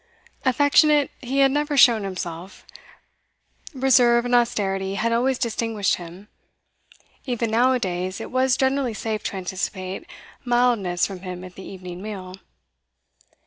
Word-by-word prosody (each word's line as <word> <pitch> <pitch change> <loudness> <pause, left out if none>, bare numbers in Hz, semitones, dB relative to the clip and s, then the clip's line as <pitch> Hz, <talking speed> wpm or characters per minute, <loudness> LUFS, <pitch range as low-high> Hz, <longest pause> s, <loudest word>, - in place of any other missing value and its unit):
Affectionate 285 +2 +4
he 270 +1 -1
had 270 -1 +5
never 295 +1 -1
shown 235 -4 +6
himself; 185 -1 -7 1.1
reserve 250 -4 +4
and 245 - -2
austerity 195 -5 +1
had 230 +3 0
always 255 +2 +1
distinguished 225 -4 -1
him. 175 +3 -11 1.0
Even 235 -3 -1
now 245 +3 +3
a - - +2
days, 185 -3 -3
it - - -7
was 255 0 +2
generally 265 -3 0
safe 215 -1 -3
to - - -3
anticipate 190 - -5 0.3
mildness 240 -8 +1
from 195 -2 -7
him 180 -1 -7
at 185 -1 -10
the 190 - -11
evening 185 -2 -9
meal. 195 -3 -7
225 Hz, 135 wpm, -23 LUFS, 190-255 Hz, 1.1 s, shown